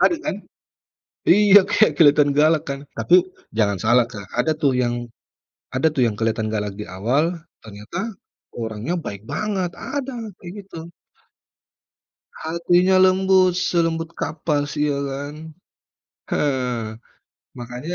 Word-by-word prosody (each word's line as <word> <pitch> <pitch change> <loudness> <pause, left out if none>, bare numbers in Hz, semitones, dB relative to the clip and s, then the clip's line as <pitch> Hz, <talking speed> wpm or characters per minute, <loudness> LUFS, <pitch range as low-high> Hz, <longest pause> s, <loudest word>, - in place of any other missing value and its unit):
Ada, 340 - +4
kan? - - -2 0.9
Iya, 205 +1 +6
kayak 215 - +2
kelihatan 145 -2 +5
galak, 155 0 +3
kan? 140 +1 -5
Tapi 180 +1 +4 0.2
jangan 100 -4 0
salah 120 0 +4
Kak, 105 -5 -10
ada, 155 +6 +2
tuh, 140 -4 +1
yang 120 -1 -1 0.6
ada, 135 +5 +2
tuh, 135 -5 +1
yang 115 - 0
kelihatan 110 +1 -1
galak 105 -2 -3
di 105 - -6
awal 140 - -1 0.2
ternyata 110 - -6 0.4
orangnya 110 +6 -4
baik 100 -6 -7
banget, 185 - -2
ada 270 -2 -5 0.2
kayak 175 0 -9
gitu. 165 -3 -9 1.5
Hatinya 175 +3 +2
lembut, 185 -1 +4
selembut 165 -2 0
kapas 150 -2 -2
iya, 150 -1 +1
kan. 145 +2 -5 1.0
Eee, 125 -6 -1 0.6
makanya 125 +8 -6
150 Hz, 120 wpm, -21 LUFS, 120-175 Hz, 1.5 s, Iya